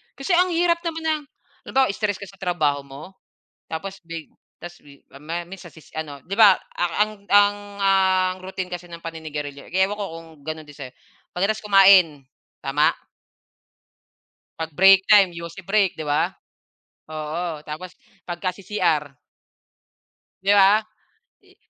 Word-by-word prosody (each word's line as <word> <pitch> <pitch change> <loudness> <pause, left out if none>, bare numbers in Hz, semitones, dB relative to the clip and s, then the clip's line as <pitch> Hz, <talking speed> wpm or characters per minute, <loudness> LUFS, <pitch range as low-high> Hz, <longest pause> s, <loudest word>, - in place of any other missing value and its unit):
Kasi 275 +8 -4
ang 360 +1 +4
hirap 340 0 +2
naman 325 -1 -4
ng 315 -1 0 0.5
halimbawa 265 -4 +2
stress 205 -1 -2
ka 200 - -7
sa 195 0 -17
trabaho 155 -6 0
mo 140 +1 -11 0.6
tapos 190 +4 -6
bi 165 -2 -8 0.3
tas 175 +1 -9
bi 140 -1 -18
mamaya 155 +5 -6
minsan 175 -1 -12
si 160 - -15
si - - -20
ano, 145 -3 -6
'di 195 +3 -5
ba 210 -4 +8
a 175 - -4 0.2
ang 215 0 +2 0.2
ang 205 0 +5 0.2
ang 190 -1 +3
routine 185 -1 -5
kasi 180 0 -6
ng 170 -1 -10
paninigarilyo 150 -4 -7
ewan 190 +3 +1
ko 205 - -3
kung 165 0 -10 0.2
gano'n 155 0 -5
din 145 - -14
sa 140 - -7
'yo, 125 - -18 0.4
pagkatapos 200 +5 -1
kumain, 190 -8 +6 0.4
tama? 145 +3 +2 1.7
'Pag 160 0 -4
break 195 +2 +7
time, 200 -3 +6
yosi 170 +2 -8
break, 195 0 +1
'di 155 - -6
ba? 145 0 +1 0.8
Oo, 155 +1 -4
tapos 165 +4 -7 0.4
pagka 175 +1 -2
si-CR. 170 -8 -1 1.2
'Di 195 +1 +2
ba? 200 +2 +6 0.6
I - - -25
180 Hz, 150 wpm, -23 LUFS, 155-200 Hz, 1.7 s, ba